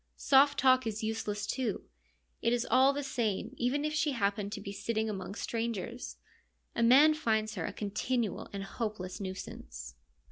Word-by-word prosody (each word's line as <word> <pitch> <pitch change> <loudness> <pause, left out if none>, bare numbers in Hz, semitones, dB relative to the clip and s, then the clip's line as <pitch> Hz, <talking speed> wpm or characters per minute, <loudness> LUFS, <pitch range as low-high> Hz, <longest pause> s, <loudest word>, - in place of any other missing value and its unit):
Soft 280 +1 +5
talk 255 -2 +4
is 220 0 -3
useless, 215 -2 -2
too; 245 -2 -2 0.6
it 230 - +2
is 245 0 0
all 265 +2 +6
the 285 +1 -3
same 230 -3 -2
even 275 +4 0
if 305 - -1
she 305 -1 +1
happen 205 -3 0
to 205 - -5
be 200 0 -6
sitting 220 +2 -2
among 200 -1 -5
strangers: 230 +1 -4 0.6
a - - 0
man 270 +7 +7
finds 220 -7 0
her 180 -6 -3
a - - -3
continual 215 +1 -2
and 200 -1 -4
hope 215 +1 -4
less 185 +3 -6
nuisance. 60 - -7
225 Hz, 170 wpm, -31 LUFS, 205-255 Hz, 0.6 s, man